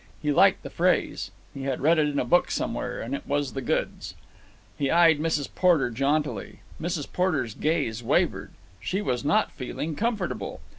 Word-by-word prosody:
He 150 - 0
liked - - +4
that - - -7
phrase. - - +1 0.2
He 135 - -7
had 135 -2 -1
read 160 +3 +4
it 150 - +3
in 145 - -3
a - - +1
book 175 +8 +3
somewhere, - - -2
and 120 +4 -5
it 140 - -5
was 145 -1 -1
the 135 - -3
goods. 125 - -2 0.6
He 140 - -1
eyed 165 -3 +5
Mrs. 150 -3 0
Porter 170 -9 +3
jauntily. 145 +5 -1 0.2
Mrs. 165 -3 -2
Porter's 165 - 0
gaze 145 -8 -1
wavered. 115 - +1 0.3
She 190 - -2
was 125 -5 -1
not 210 +9 +2
feeling 150 +4 -5
comfortable. 230 +4 -2
150 Hz, 170 wpm, -26 LUFS, 135-165 Hz, 0.6 s, eyed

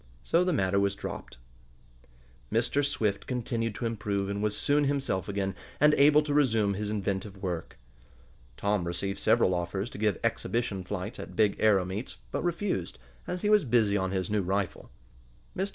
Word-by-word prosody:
So 170 +2 +3
the 180 - +1
matter 100 - +2
was 100 0 +1
dropped. 60 - -7 1.1
Mr. 125 +6 +1
Swift 110 -8 -1
continued 115 -3 -2
to 120 - -4
improve, 100 -3 -1
and 100 0 -3
was 105 -1 0
soon 145 0 +2
himself 135 -11 -1
again, 100 -1 -1 0.3
and 150 +1 +6
able 150 +1 +6
to 150 -1 -2
resume 115 -8 +3
his 105 +1 -3
inventive 100 -1 -2
work. 90 -3 -4 0.8
Tom 100 -3 0
received 95 +3 -2
several 115 -5 +3
offers 90 +5 -2
to - - -8
give 105 -1 +1
exhibition 115 -3 -1
flights 95 0 -5
at 90 - -8
big 105 0 +3
aero 100 -4 +4
meets, 100 +6 -5
but - - -1
refused, 175 - -2 0.3
as 180 +2 -4
he 205 - +2
was 210 -3 +6
busy 115 -6 +3
on 95 -2 0
his 95 0 -2
new 105 -1 +2
rifle. 95 +1 -2 0.7
Mr. 190 +2 -1
105 Hz, 170 wpm, -29 LUFS, 95-125 Hz, 1.1 s, and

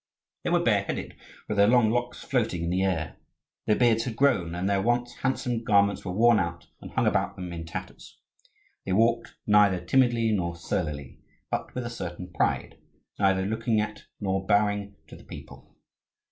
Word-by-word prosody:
They - - -1
were - - +2
bare - - +3
headed, - - -5 0.3
with 105 - -2
their 100 0 +6
long 115 -2 +4
locks 120 +1 -2
floating 110 -10 -1
in 85 - -1
the 90 +1 +1
air. 90 -4 -1 0.5
Their 105 - +4
beards 115 -2 +3
had 120 -3 -4
grown, 95 -12 +2
and 90 +2 -2
their 100 -1 +2
once 120 +2 0
handsome 125 -3 -1
garments 100 -2 +3
were 95 - -4
worn 115 +4 +4
out, 85 0 -3 0.2
and - - -9
hung - - 0
about - - +1
them 90 -2 -6
in 80 -1 -6
tatters. 80 - -8 0.7
They 95 - -2
walked 115 +3 +1
neither 105 -3 +4
timidly 115 +4 +2
nor 85 -5 -1
surlily, 75 -5 -4 0.3
but - - -3
with 125 -1 -3
a 120 - -4
certain 90 -5 -7
pride, - - -1 0.4
neither 95 -1 +2
looking 110 +1 0
at 105 0 -4
nor 95 -2 -1
bowing 105 -1 +1
to - - -12
the - - -14
people. - - -12
105 Hz, 180 wpm, -27 LUFS, 90-115 Hz, 0.7 s, their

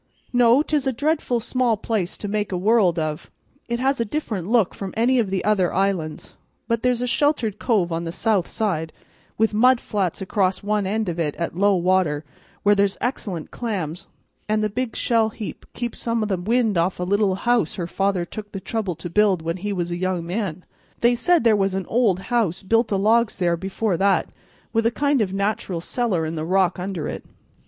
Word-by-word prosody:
No, 245 +3 +5
'tis 295 -3 0
a - - +3
dreadful 285 -2 0
small 245 -1 +1
place 210 -4 -2
to 205 - -5
make 210 0 -2
a 180 - -1
world 195 -3 +3
of; 155 -1 -3 0.4
it 235 - -1
has 270 +2 +1
a - - +2
different 215 - -3
look 225 -5 +3
from 195 -2 -6
any 245 +3 +3
of 215 -5 +1
the 190 -1 -2
other 200 -4 +2
islands, 185 -5 -2 0.3
but 230 -1 0
there's 250 -1 +1
a - - +1
sheltered 245 -5 +1
cove 200 -8 +1
on 165 +1 -2
the 165 - -4
south 200 -1 +1
side, 165 -7 -2 0.4
with 220 0 +2
mud 250 +3 +5
flats 195 -7 -2
across 190 -1 0
one 205 -1 0
end 215 +1 -1
of 175 -1 -3
it 150 -3 -1
at 170 -1 -3
low 200 +2 +3
water 175 -4 +1 0.4
where 205 - +5
there's 200 -1 +1
excellent 200 - -3
clams, 185 -8 -4 0.4
and 215 0 +1
the 210 - 0
big 250 +1 -3
shell 225 -2 +2
heap 220 -1 -8
keeps 240 -1 -4
some 230 -1 0
o' - - 0
the 200 -2 0
wind 220 +1 +1
off 180 +2 0
a - - -1
little 200 +1 +2
house 235 -3 +1
her 175 - -3
father 195 0 0
took 205 +3 -8
the 195 - -4
trouble 200 -3 -3
to 175 - -7
build 190 -1 +2
when 165 +2 -2
he 205 +3 -3
was 175 -3 -2
a 175 - -2
young 185 -2 -1
man. 180 -2 -3 0.4
They 240 +1 +5
said 345 +5 +3
there 225 -2 +5
was 195 -2 +1
an 190 -1 -2
old 215 -5 +2
house 210 -7 +1
built 225 +4 +2
o' 200 - +2
logs 225 +3 +2
there 175 -2 +2
before 195 +2 -2
that, 195 +1 +2 0.4
with 225 0 +2
a - - +4
kind 280 +1 +1
of 195 -3 0
natural 195 -2 -1
cellar 185 -3 -1
in 160 - -3
the 155 -1 -3
rock 185 +1 +1
under 180 -4 -3
it. - - -5
205 Hz, 210 wpm, -23 LUFS, 180-230 Hz, 0.4 s, No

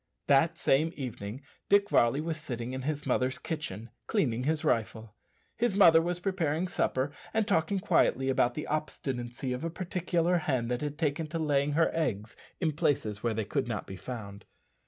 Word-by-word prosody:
That 155 +4 +4
same 155 +4 +2
evening 125 -2 -6 0.3
Dick 200 0 +5
Varley 120 +5 +4
was 160 0 -3
sitting 120 -3 -4
in 130 - -3
his 150 +2 -3
mother's 130 +1 +1
kitchen 115 - -5 0.2
cleaning 125 - 0
his 155 +2 0
rifle. 110 -4 -1 0.4
His 235 -4 +1
mother 165 -5 +7
was 175 +1 -2
preparing 175 -3 0
supper, 140 -6 0 0.2
and 220 -2 +2
talking 165 +1 +2
quietly 165 -8 +2
about 125 -2 +2
the 150 - -3
obstinacy 130 -4 -3
of 125 - -5
a 165 - -1
particular 175 0 0
hen 130 -7 -1
that 125 0 -1
had 150 0 -3
taken 155 0 -1
to 165 +2 -4
laying 145 -2 +1
her 165 +2 +3
eggs 110 -9 -2 0.2
in 165 -4 +1
places 110 -9 0
where 115 -2 0
they 110 -1 -1
could 135 +3 -1
not 110 -3 -3
be 95 - -8
found. 100 0 -8
145 Hz, 175 wpm, -30 LUFS, 120-165 Hz, 0.4 s, mother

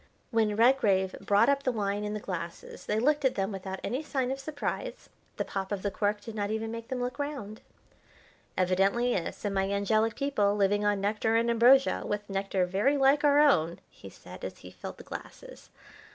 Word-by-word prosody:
When 220 -3 +2
Redgrave 210 -6 +3
brought 205 +3 +3
up 280 0 +2
the 260 - 0
wine 205 -2 -2
and 210 0 -3
the - - -3
glasses 170 -4 -7
they 210 - 0
looked 290 +5 +2
at 265 - +2
them 195 +1 -1
without 190 -1 -5
any 260 +4 -2
sign 265 -4 -2
of 270 - -3
surprise. 290 +1 -5 0.3
The - - -1
pop 195 0 -4
of 200 -2 -3
the 200 - -1
cork 205 +1 -1
did 225 - -8
not 205 -1 -2
even 220 +1 -2
make 230 0 -7
them 260 -2 -3
look 250 +3 -4
round. 265 -8 -5 1.0
"Evidently 195 +7 +2
a 170 - -1
semi 195 -1 -2
angelic 215 +3 +1
people, 210 -8 +1
living 205 0 +2
on 205 -1 +1
nectar 215 +2 0
and 230 +1 +2
ambrosia, 250 +4 +5
with 205 0 -3
nectar 195 -1 0
very 205 +11 +1
like 275 +2 +4
our 290 0 +5
own," 170 - +3
he - - -12
said, - - -13
as - - -5
he - - -9
filled - - -9
the - - -11
glasses. - - -10
210 Hz, 195 wpm, -29 LUFS, 200-255 Hz, 1.0 s, ambrosia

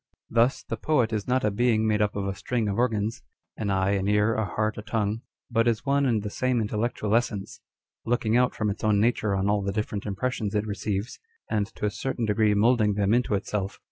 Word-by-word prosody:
Thus 120 +3 +2
the 115 - -4
poet 120 -4 +1
is 105 -2 -2
not 130 +1 +1
a 105 - +2
being 110 0 +2
made 105 -1 +2
up 105 0 +1
of 100 -1 -2
a 100 - -1
string 110 +3 -2
of 100 +2 -1
organs 115 -1 0
â€" 115 - -18
an 105 - -1
eye, 95 0 +1
an 100 -1 0
ear, 105 +2 +3
a 110 - 0
heart, 110 +3 -1
a - - -4
tongue 105 -1 -1
â€" - - -15 0.3
but 115 +1 +2
is 115 +1 0
one 140 0 +2
and 110 -4 +1
the 105 - -3
same 130 +1 0
intellectual 105 0 -1
essence, 105 -4 -2 0.4
looking 115 -1 +1
out 125 0 +3
from 105 -2 0
its 100 - -8
own 105 -1 +3
nature 110 -2 +1
on 95 +1 0
all 105 0 +2
the 100 0 -2
different 105 0 -3
impressions 105 +1 -2
it 105 0 +1
receives, 105 +2 -3 0.3
and 105 -2 +1
to - - -3
a 105 - +1
certain 120 +4 -2
degree 105 0 +2
moulding 110 -1 +3
them 100 +1 +2
into 120 -3 +2
itself. 100 0 -3
110 Hz, 235 wpm, -26 LUFS, 100-115 Hz, 0.4 s, ear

